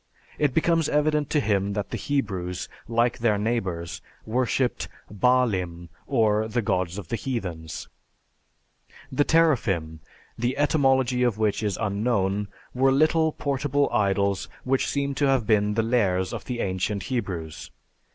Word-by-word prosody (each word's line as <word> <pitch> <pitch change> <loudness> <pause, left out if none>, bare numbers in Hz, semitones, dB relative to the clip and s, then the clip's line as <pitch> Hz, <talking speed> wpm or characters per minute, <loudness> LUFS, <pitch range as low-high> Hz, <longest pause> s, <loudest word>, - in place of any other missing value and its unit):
It 145 -4 +1
becomes 165 -1 +2
evident 150 -1 +1
to 150 - +2
him 100 -5 0
that 105 -1 -3
the - - -2
Hebrews, 95 -10 -2 0.2
like 120 +1 +1
their 110 -3 +2
neighbors, 95 -7 -2 0.2
worshiped 125 +2 0 0.3
"baalim" 95 -8 +1 0.2
or 110 -5 +2
the 120 +1 -1
gods 90 -1 -1
of 95 -5 -7
the - - 0
heathens. 90 - -4 1.2
The 145 - +2
"teraphim," 105 - +2 0.4
the 120 +3 0
etymology 135 -4 +2
of 120 -4 +2
which 110 -1 +1
is 105 -3 -1
unknown, 100 -1 0 0.3
were 135 +1 +3
little 155 +3 +3
portable 140 0 0
idols 100 -1 +1
which 130 +1 +1
seem 140 0 -1
to 140 +1 +1
have 135 -4 +2
been 105 -1 +2
the 115 - +2
Lares 95 -6 +1
of - - -6
the 120 -2 -3
ancient 95 +2 -1
Hebrews. 85 -10 -4
115 Hz, 140 wpm, -25 LUFS, 95-135 Hz, 1.2 s, were